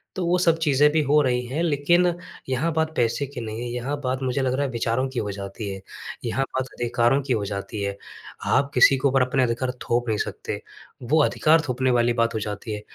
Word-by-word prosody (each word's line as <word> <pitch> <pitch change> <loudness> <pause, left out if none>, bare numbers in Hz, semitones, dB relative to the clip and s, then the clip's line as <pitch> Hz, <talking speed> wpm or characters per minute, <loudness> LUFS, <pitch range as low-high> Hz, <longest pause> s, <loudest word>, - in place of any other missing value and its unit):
तो 185 - -2
वो 180 +1 +3
सब 165 -2 +3
चीज़ें 150 -2 +4
भी 155 +1 +2
हो 150 +1 +3
रही 125 -2 0
हैं। 140 +6 -2
लेकिन 170 +3 +3 0.4
यहाँ 135 +6 0
बात 160 0 0
पैसे 120 +3 +1
की 135 -2 -7
नहीं 110 0 -5
है, 120 - -4
यहाँ 125 +4 -3
बात 130 0 -1
मुझे 130 +1 0
लग 130 -1 0
रहा 140 +2 0
है - - -2
विचारों 115 +2 0
की 130 -2 -3
हो 105 -2 -2
जाती 100 +1 -6
है, 95 - -8 0.4
यहाँ 130 +3 0
बात 130 0 0
अधिकारों 120 +2 +1
की 130 - +2
हो 105 -3 -1
जाती 100 +1 -5
है। 100 0 -3 0.5
आप 140 +1 +2
किसी 130 +2 +6
के 130 - +2
ऊपर 135 0 +3
अपने 130 +1 +2
अधिकार 125 +1 -1
थोप 120 +1 0
नहीं 110 - +1
सकते, - - -4 0.4
वो 155 +6 +3
अधिकार 160 +3 +3
थोपने 130 0 +1
वाली 120 0 +2
बात 115 -1 +1
हो 110 - -1
जाती 105 +1 -5
है। 105 - -5
130 Hz, 230 wpm, -24 LUFS, 115-140 Hz, 0.5 s, किसी